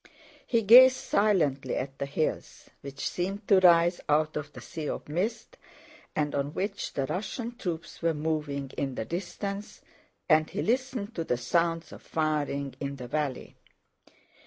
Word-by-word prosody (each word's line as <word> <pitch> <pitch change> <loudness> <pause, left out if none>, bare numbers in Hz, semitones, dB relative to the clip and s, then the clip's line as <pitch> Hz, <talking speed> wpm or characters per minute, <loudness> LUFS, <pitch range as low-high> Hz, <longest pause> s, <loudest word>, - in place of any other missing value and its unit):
He 230 -2 +2
gazed 255 +5 +9
silently 150 - +1
at 135 +1 -4
the 140 - -2
hills 155 +3 -3
which 140 0 -5
seemed 195 +4 -3
to 195 - +6
rise 175 -1 +5
out 155 +1 +2
of 150 -1 -4
the - - -10
sea 155 -3 -6
of - - -5
mist 210 - -3 0.6
and 150 -1 0
on 140 +1 -2
which 200 +1 -3
the 135 - -1
Russian 225 - -4
troops 170 -6 -5
were 165 -1 +1
moving 150 -3 -2
in 135 -2 -2
the - - -3
distance, 195 - -5 0.5
and 155 -1 +4
he 195 - -3
listened 245 -3 -1
to 165 - -2
the 125 - 0
sounds 165 +6 0
of - - -11
firing 145 -3 -1
in 140 0 -4
the 125 -2 -8
valley. 145 -1 -3
160 Hz, 160 wpm, -28 LUFS, 140-200 Hz, 0.6 s, gazed